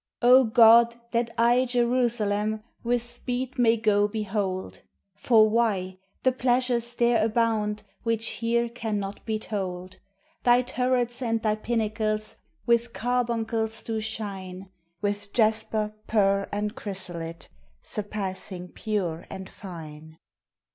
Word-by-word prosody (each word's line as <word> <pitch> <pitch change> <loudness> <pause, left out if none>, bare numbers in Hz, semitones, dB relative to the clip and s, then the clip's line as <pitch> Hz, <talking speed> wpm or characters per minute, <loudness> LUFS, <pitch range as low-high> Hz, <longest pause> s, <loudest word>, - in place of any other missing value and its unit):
O 255 +2 +7
God! 230 +1 +6 0.2
that 235 0 0
I 240 +2 +4
Jerusalem 235 -4 0 0.2
With 240 0 +1
speed 250 +2 -4
may 230 -1 +4
go 205 -2 +3
behold! 205 -3 -3 0.3
For 220 +1 +4
why? 200 -5 0 0.2
the 260 - +4
pleasures 245 -1 +1
there 235 -2 +3
abound 215 -2 0 0.2
Which 230 -1 0
here 235 +1 +1
cannot 210 -4 -4
be 220 -1 0
told. 185 -4 -5 0.5
Thy 245 +1 +5
turrets 250 -1 0
and 230 -2 0
thy 215 -1 +2
pinnacles 215 -1 -2 0.3
With 235 0 +2
carbuncles 230 -2 -1
do 225 -1 -2
shine 195 -4 -6 0.3
With 205 0 -2
jasper, 215 -1 +1
pearl, 200 -2 +2
and 210 +1 -2
chrysolite, 180 -8 -6 0.4
Surpassing 190 -3 -4
pure 180 -7 -3
and 190 -1 -7
fine. 160 -5 -10
220 Hz, 115 wpm, -26 LUFS, 205-235 Hz, 0.5 s, O